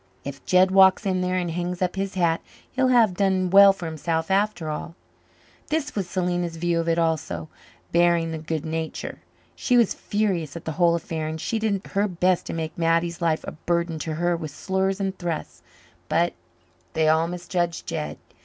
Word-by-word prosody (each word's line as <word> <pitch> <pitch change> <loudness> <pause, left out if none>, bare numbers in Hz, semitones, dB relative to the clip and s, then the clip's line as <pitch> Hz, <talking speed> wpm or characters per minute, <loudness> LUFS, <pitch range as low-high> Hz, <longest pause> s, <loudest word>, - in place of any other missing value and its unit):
"If 140 0 -7
Jed 185 +1 +5
walks 190 +2 +6
in 185 -2 +1
there 180 0 0
and 175 -2 -1
hangs 175 +1 -3
up 180 0 -1
his 195 0 -3
hat 170 -3 +2 0.3
he'll 260 0 +2
have 235 -6 +4
done 185 -1 +1
well 200 0 +9
for 195 -3 -7
himself 160 +2 -2
after 195 -4 +1
all." 155 +2 -5 0.7
This 300 -1 -1
was 190 -4 -3
Selena's 175 -2 -1
view 170 0 0
of 165 0 -1
it 165 - +2
also, 155 - -1 0.4
barring 170 -1 +3
the 160 - -4
good 160 0 -3
nature. 160 0 -4 0.4
She 250 - +2
was 235 -4 +4
furious 185 -8 -1
at 170 - -8
the 160 - -2
whole 170 +1 +3
affair, 160 -1 -3
and 160 +1 -4
she 225 +7 -2
did 205 -3 -1
her 200 +1 +1
best 180 -1 +1
to - - -4
make 160 -1 -4
Mattie's 170 0 +1
life 160 -2 +1
a - - -3
burden 170 0 -2
to 155 0 -3
her 175 +2 +1
with 160 -2 -5
slurs 190 +5 -1
and 195 -1 -1
thrusts. 170 -3 -4 0.5
But - - +2 0.6
they 160 -1 +2
all 160 +1 +3
misjudged 175 -1 -2
Jed. 75 0 -4
175 Hz, 190 wpm, -24 LUFS, 165-190 Hz, 0.7 s, well